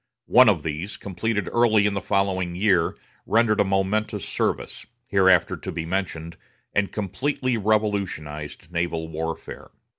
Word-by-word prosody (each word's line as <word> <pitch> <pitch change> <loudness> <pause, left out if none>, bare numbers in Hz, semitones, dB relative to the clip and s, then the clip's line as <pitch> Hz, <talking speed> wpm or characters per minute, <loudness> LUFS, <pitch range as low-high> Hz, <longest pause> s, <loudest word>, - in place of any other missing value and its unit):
One - - +7
of - - +1
these, 85 +7 -4
completed 105 +1 -2
early 110 -3 +4
in 105 - +1
the 100 - -2
following 95 -3 0
year, 95 -3 +2 0.3
rendered 115 -1 +3
a - - +6
momentous 100 +1 0
service, - - -2 0.2
hereafter 95 -2 +4
to - - -6
be 80 - -4
mentioned, 85 -2 -3 0.4
and 100 -1 +1
completely 130 +5 -1
revolutionized 100 -9 -2
naval 85 -1 -2
warfare. 80 +1 -6
95 Hz, 130 wpm, -24 LUFS, 85-105 Hz, 0.4 s, One